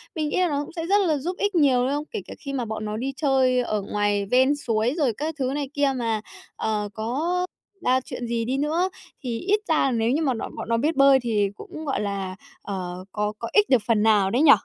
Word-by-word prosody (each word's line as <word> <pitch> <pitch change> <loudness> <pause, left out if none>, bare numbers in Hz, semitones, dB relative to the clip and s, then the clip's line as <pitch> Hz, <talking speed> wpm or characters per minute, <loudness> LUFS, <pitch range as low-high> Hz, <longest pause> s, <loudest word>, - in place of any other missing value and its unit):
mình 305 -2 -1
nghĩ - - -1
là 360 - +3
nó 290 0 -1
cũng - - -10
sẽ 330 -2 -4
rất 400 +3 +4
là 305 -2 +2
giúp 355 +7 -4
ích 410 -2 0
nhiều, 270 -6 +4
đúng 260 - +1
không? 295 +1 -1
Kể 435 - -3
cả - - -7
khi 275 -2 -6
mà 250 -3 -1
bọn 215 0 -4
nó 210 +1 -3
đi 265 +3 -2
chơi 265 -4 +3
ở 215 -4 -1
ngoài 205 0 0
ven 260 +3 +4
suối 230 -2 0
rồi 265 -7 +2
các 310 +1 -3
thứ 260 0 0
này 285 -2 -2
kia 285 -1 +2
mà, 225 -3 -1 0.3
ờ, 210 -1 -1
có 310 - -1 0.4
ra 255 +1 +4
chuyện 240 - -5
gì 230 -1 -1
đi 260 +3 -1
nữa 320 +6 +1 0.3
thì 235 -2 -2
ít 410 +3 +2
ra 290 -4 +3
nếu 230 0 +1
như 295 +5 +1
mà 270 -5 +2
nó 225 - -4
bọn - - -6
nó 230 - +2
biết 305 +7 +1
bơi 275 -1 +6
thì 215 -5 +1
cũng, 315 +6 -9
gọi 270 - -1
là, 195 -2 -3 0.3
ờ, 185 -2 -5
có 210 0 -1
có 230 - -4
ích 420 0 +4
được 255 -5 +5
phần 220 -2 +3
nào 210 -3 +4
đấy 250 +5 +2
nhỉ? 300 -2 +8
255 Hz, 255 wpm, -24 LUFS, 220-295 Hz, 0.4 s, nhỉ